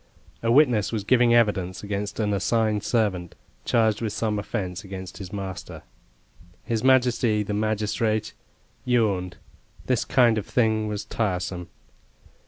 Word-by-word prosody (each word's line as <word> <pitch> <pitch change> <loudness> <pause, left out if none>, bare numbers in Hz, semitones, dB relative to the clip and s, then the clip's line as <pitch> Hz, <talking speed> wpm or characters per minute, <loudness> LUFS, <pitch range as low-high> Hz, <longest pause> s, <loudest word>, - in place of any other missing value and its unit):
A 115 - +1
witness 125 -6 +4
was 110 -3 -2
giving 120 +2 +4
evidence 95 -6 +1
against 100 +1 -4
an 105 -2 +1
assigned 110 +1 +1
servant, 95 -7 -1 0.3
charged 110 -2 +2
with 110 -3 -2
some 105 -2 -1
offence 100 -2 -4
against 95 -2 -8
his 95 -3 -8
master. 95 -3 -6 0.8
His 115 -1 -2
majesty, 125 -4 +3
the 105 - -4
magistrate, 110 +1 -1 0.5
yawned 100 -7 0 0.5
this 125 -2 +1
kind 120 -4 +3
of 105 - -8
thing 110 -3 +1
was 105 0 -4
tiresome. 90 -5 -2
105 Hz, 130 wpm, -25 LUFS, 100-115 Hz, 0.8 s, witness